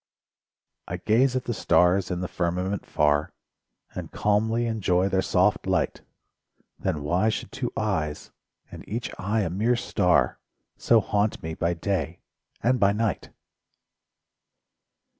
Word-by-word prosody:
I - - -4
gaze 125 +4 +2
at 130 - 0
the 120 - -2
stars 90 0 +3
in 90 -1 -2
the 90 - -2
firmament 90 +3 -2
far 75 0 +1 0.6
And - - -6
calmly 110 +3 +1
enjoy 95 -5 +1
their 95 0 +1
soft - - +1
light. - - 0 0.8
Then 75 -2 -2
why 90 +9 +2
should 110 - -4
two 130 -2 -3
eyes, 80 -9 -2 0.4
and - - -9
each 115 +2 -3
eye 105 +4 0
a 95 - -1
mere 110 +7 +1
star, 95 -6 +1 0.4
So 115 -2 +3
haunt 105 +1 -1
me 80 0 -4
by 85 +2 -1
day 85 -1 -2 0.4
and 125 +1 +2
by 100 -1 +4
night? 110 -2 -2
100 Hz, 135 wpm, -25 LUFS, 90-110 Hz, 0.8 s, by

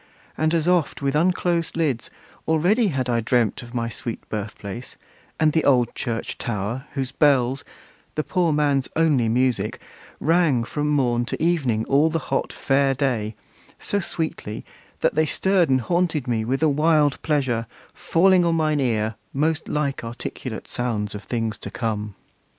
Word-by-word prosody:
and 155 +1 +1
as 165 0 0
oft 175 -6 +1
With 140 +1 +1
unclosed 170 0 +1
lids, 145 -8 0 0.4
already 180 +9 +3
had 135 -7 -1
I 120 -1 +1
dreamt 115 -1 +1
Of 120 0 -11
my 115 -1 0
sweet 115 0 -6
birth 105 0 -4
place, 105 +5 -7 0.4
and 155 -1 +3
the 160 - +2
old 125 -4 +3
church 115 -3 -4
tower, 115 +3 -3
Whose 135 -2 -2
bells, 135 -3 +2 0.5
the 155 - 0
poor 175 -1 +1
man's 145 -3 +1
only 150 -8 +3
music, 120 -3 0 0.4
rang 160 -7 +3
From 150 +5 -2
morn 120 -5 +2
to - - -4
evening, 140 -10 +1
all 145 +4 +3
the 165 - 0 0.2
hot - - 0
Fair 135 0 +1
day, 120 -6 -1 0.4
So 205 - -1
sweetly, 160 - -4 0.4
that - - +2
they 155 +1 +2
stirred 190 0 +2
and 130 -1 +3
haunted 170 -2 0
me 115 -2 0
With 135 +6 -1
a - - +5
wild 150 -1 +3
pleasure, 130 -7 0 0.3
falling 185 +1 +3
on 170 -1 +2
mine 155 -2 +1
ear 110 -4 0 0.2
Most 155 +3 0
like 140 -4 -1
articulate 115 0 -6
sounds 110 -4 -2
of 105 0 -7
things 115 0 -2
to - - -6
come! 105 -3 -3
135 Hz, 160 wpm, -23 LUFS, 120-160 Hz, 0.5 s, a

